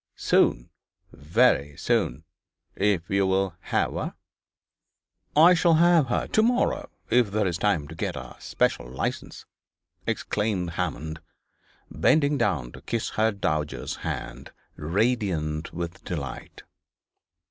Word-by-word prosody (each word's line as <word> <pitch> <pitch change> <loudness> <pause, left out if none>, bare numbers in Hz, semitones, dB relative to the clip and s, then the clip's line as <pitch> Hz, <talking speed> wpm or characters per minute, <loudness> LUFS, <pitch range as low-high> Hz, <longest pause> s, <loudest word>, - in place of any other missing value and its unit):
Soon, - - +2 0.4
very 75 - +2
soon, 65 +6 0 0.5
if 95 -4 +1
you 100 0 +1
will 95 -1 +1
have - - -1
her!' - - -4 1.2
'I 170 +4 +7
will 170 -2 +5
have 170 -3 +5
her 120 - 0
to 220 - +2
morrow, 245 +3 +1 0.2
if 120 -2 +4
there 105 +1 0
is 85 -2 -1
time 85 -9 +1
to - - -9
get - - -3
a - - -8
special 60 -1 -1
licence,' 65 - -4 0.6
exclaimed 105 -5 -1
Hammond, 80 -2 -3 0.7
bending 150 -1 +3
down 70 - 0
to - - -12
kiss 115 -2 -3
the 110 +1 +2
dowager's 75 - -2
hand, - - -6 0.2
radiant 85 -3 -1
with 85 +2 -6
delight. 70 -7 -6
95 Hz, 120 wpm, -26 LUFS, 75-115 Hz, 1.2 s, I